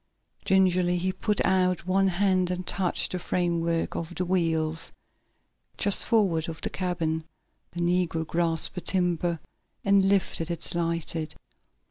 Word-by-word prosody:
Gingerly 185 -2 +3
he 185 +2 0
put 210 +2 +1
out 185 -2 +1
one 195 +1 +2
hand 185 -1 +2
and 180 0 -3
touched 185 -2 0
the 180 - -2
framework 170 -2 -1
of 170 +1 -5
the 180 - -1
wheels, 165 -3 0 0.9
just 200 - +1
forward 180 -7 +2
of 165 - -7
the - - -2
cabin. 165 -3 -2 0.5
The 175 - -3
negro 175 -2 +1
grasped 165 0 +1
the 180 - -5
timber, 175 -2 0 0.5
and 195 -1 +4
lifted 185 -4 0
it 170 -1 -4
slightly. 170 -2 -2
175 Hz, 135 wpm, -27 LUFS, 165-185 Hz, 0.9 s, and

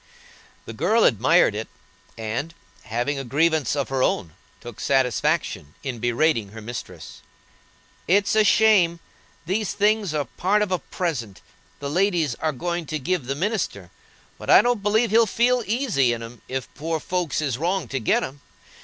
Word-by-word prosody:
The - - -7
girl 225 +1 +2
admired 115 -1 +4
it, 110 +2 -4 0.5
and, 115 +9 -4 0.3
having 120 +5 -2
a - - -4
grievance 150 +1 +1
of 140 -2 -2
her 135 -1 -1
own, 85 -9 0 0.3
took 120 -3 -10
satisfaction 125 - 0
in 130 -4 -4
berating 120 -3 +1
her 110 - -8
mistress. 105 -7 -8 0.9
"It's 200 +4 +3
a 215 - +5
shame! 195 -6 +4 0.5
These 195 +4 -1
things 210 -2 +1
are 145 -2 0
part 200 - +1
of 200 - -4
a 185 - +1
present, 120 - -4 0.4
the 140 - -4
ladies 175 -5 +1
are 155 0 +1
going 170 +4 -3
to 155 - -2
give 150 -1 -2
the 135 - -1
minister; 165 - -2 0.5
but - - -8
I - - +8
don't 240 -3 +1
believe 215 +2 +2
he'll 230 +1 +5
feel 245 +4 +2
easy 210 - +1
in 115 -1 -5
'em 115 0 -11
if 130 -1 -4
poor 160 +1 -3
folks 175 -2 -2
is 135 -5 -2
wronged 175 -4 -1
to 135 - -1
get 110 - +1
'em. 140 +2 -7
155 Hz, 165 wpm, -23 LUFS, 120-195 Hz, 0.9 s, I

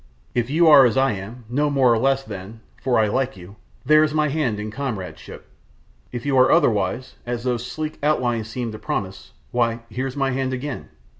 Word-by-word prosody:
If 120 0 0
you 165 +4 +4
are 145 -3 +9
as 120 - -1
I 135 -1 +3
am, 105 +5 -7
no 145 +5 0
more 135 -4 +4
nor 115 - +1
less 135 +2 +2
then 105 +1 -9 0.2
for 125 -2 +1
I 110 -1 +3
like 130 +1 -1
you 95 +4 -13 0.3
there's 155 +1 +4
my 150 -1 +2
hand 135 -8 -1
in 105 0 -5
comradeship. 100 - -6 0.6
If 120 0 -6
you 140 -2 +1
are 130 - +5
otherwise, 105 +3 +1
as 120 -1 -4
those 125 -1 -1
sleek 155 +4 -5
outlines 120 -7 0
seem 120 -1 -4
to 110 - -8
promise 95 -2 -4 0.2
why, 120 -1 0
here's 130 +2 -4
my 135 -1 +1
hand 130 0 -1
again! 130 +1 -5
125 Hz, 195 wpm, -22 LUFS, 110-135 Hz, 0.6 s, are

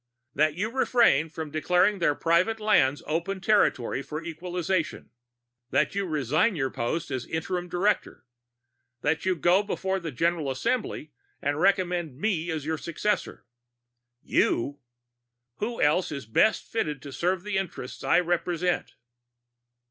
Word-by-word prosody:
"That 155 +1 +2
you 210 +5 -2
refrain 235 - +3
from 155 -1 -6
declaring 180 +6 +2
their 150 -4 +2
private 175 +9 +2
lands 145 -10 +3
open 170 +6 -2
territory 185 - +2
for 155 +3 -6
equalization. 175 +1 -3 0.6
That - - +1
you 200 -1 -1
resign 155 - +1
your 135 -4 -1
post 145 +7 -2
as 130 -2 -3
interim 175 +2 -3
director. 190 -1 0 0.8
That 160 +5 0
you 185 - +3
go 175 +4 +4
before 190 -2 -2
the 165 -3 -5
General 165 +2 0
Assembly 155 - -2 0.3
and 145 +1 -1
recommend 180 -6 +1
me 175 -2 -1
as 155 -3 -3
your 160 0 -2
successor." 210 +6 -2 0.8
"You?" 140 +4 +1 0.8
"Who 230 +3 -3
else 155 +5 +2
is 140 -5 -5
best 190 - +3
fitted 150 - -3
to 140 - -8
serve 180 +5 -1
the 210 -2 -2
interests 165 -9 -6
I 180 - +4
represent?" 175 0 -1
170 Hz, 135 wpm, -27 LUFS, 150-190 Hz, 0.8 s, go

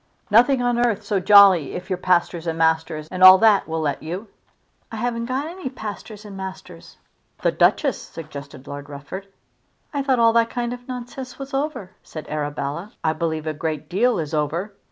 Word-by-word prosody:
"Nothing 245 +4 +5
on 240 0 +1
earth 230 -5 0
so 205 -3 0
jolly 195 -6 +6
if 185 +2 -7
your 185 - 0
pastors 175 -2 0
and 165 0 -2
masters 160 -1 0
and 185 - -5
all 185 0 +11
that 215 -1 +4
will 160 0 -2
let 145 -2 -2
you." 180 +7 -6 0.6
"I - - -6
haven't 235 +1 -2
got 260 +3 -2
any 335 -3 -6
pastors 215 -3 -8
and 205 -2 -9
masters." 190 - -9 0.5
"The - - +3
Duchess!" - - +2
suggested 145 -4 -10
Lord 145 0 -8
Rufford. 145 +8 -8 0.7
"I 285 - 0
thought 270 -2 +1
all 230 -1 +4
that 230 0 +3
kind 240 0 -3
of 245 0 -10
nonsense 250 0 -7
was 275 0 -8
over," 270 -9 -3
said 155 - -9
Arabella. 150 +5 -4
"I 160 - +2
believe 160 -1 -3
a 155 - -2
great 155 -1 -4
deal 230 +6 +2
is 155 -2 -4
over. 160 +7 -2
190 Hz, 185 wpm, -22 LUFS, 160-235 Hz, 0.7 s, all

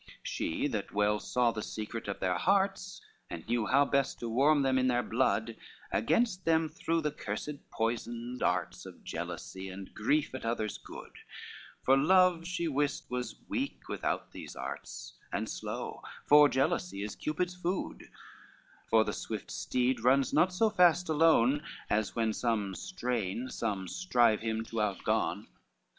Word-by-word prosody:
LXX - - -16
She 80 - -1
that 110 -8 -3
well 105 +1 +2
saw 125 +1 +1
the 110 -1 -4
secret 110 +2 -5
of 100 - -3
their 90 -1 +1
hearts, 195 0 +1 0.3
And 80 -1 -7
knew 115 -2 0
how 140 +2 +5
best 140 -1 0
to 120 - -3
warm 140 +5 +4
them 130 -1 +3
in 130 - +2
their 120 -1 +2
blood, 115 -2 0 0.4
Against 180 - +1
them 160 -1 +2
threw 165 +1 -1
the 150 -1 -1
cursed 150 0 -6
poisoned 120 +2 -3
darts - - -1
Of - - -13
jealousy, 95 0 -6
and 95 0 -9
grief 145 +8 +1
at 130 - -6
others' 115 -2 -2
good, - - -10 0.7
For 135 - +5
love 175 +3 +4
she 175 -2 -1
wist 145 -2 -1
was 125 0 -5
weak 275 +1 -3
without - - -2
those - - -9
arts, - - -7
And - - -2
slow; - - -5 0.2
for 150 0 +8
jealousy 100 -8 0
is 105 - -5
Cupid's 180 +4 -2
food; 180 +1 -4 0.8
For 110 -1 +5
the - - -3
swift - - -5
steed 125 -2 0
runs 135 +2 +3
not 185 - +4
so 215 +4 +2
fast 180 -3 +4
alone, 150 -4 +4 0.3
As 105 0 0
when 115 -1 +1
some 105 -4 -1
strain, 125 - -3
some 100 -5 -2
strive 120 - +2
him 110 0 -2
to 115 -1 -3
outgone. 105 -2 0
125 Hz, 155 wpm, -31 LUFS, 110-160 Hz, 0.8 s, for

